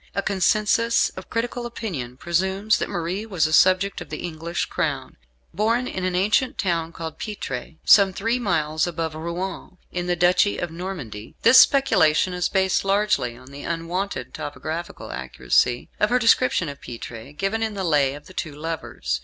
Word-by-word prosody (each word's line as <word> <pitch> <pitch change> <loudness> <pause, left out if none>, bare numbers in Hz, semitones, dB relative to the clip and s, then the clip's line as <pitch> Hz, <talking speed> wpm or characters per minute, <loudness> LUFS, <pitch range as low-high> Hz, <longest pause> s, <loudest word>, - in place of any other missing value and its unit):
A 200 - 0
consensus 215 +4 +2
of 185 - -11
critical 240 +1 -2
opinion 155 - -5
presumes 190 +6 +1
that - - -2
Marie 180 +2 -3
was 190 -8 0
a 155 - -1
subject 185 +3 +4
of - - -9
the - - -6
English 170 0 -3
Crown, - - -3 0.4
born 225 +7 +1
in 190 - -4
an 185 -1 0
ancient 215 +8 +2
town 170 -4 -1
called 165 -1 -7
Pitre, 165 - -5
some 200 -2 +7
three 230 +6 -1
miles 160 -7 0
above 165 -2 -3
Rouen, 175 +3 -5
in 180 0 -3
the 175 - +1
Duchy 180 +4 +3
of 175 - -3
Normandy. 165 - -7
This 245 +3 +8
speculation 185 - +4
is 180 -1 0
based 190 -1 +1
largely 195 - +1
on 130 +1 -14
the 140 +1 -9
unwonted 170 -3 -3
topographical 160 +3 -6
accuracy 65 - 0
of 210 - +3
her 250 - +3
description 235 -6 +3
of 140 -1 -8
Pitre, 115 +1 -8
given 195 +8 -2
in 220 -2 -1
"The 195 - -3
Lay 145 -5 +2
of 145 - -12
the 185 - -13
Two 155 -5 -4
Lovers." 145 - -3
180 Hz, 170 wpm, -23 LUFS, 155-200 Hz, 0.4 s, This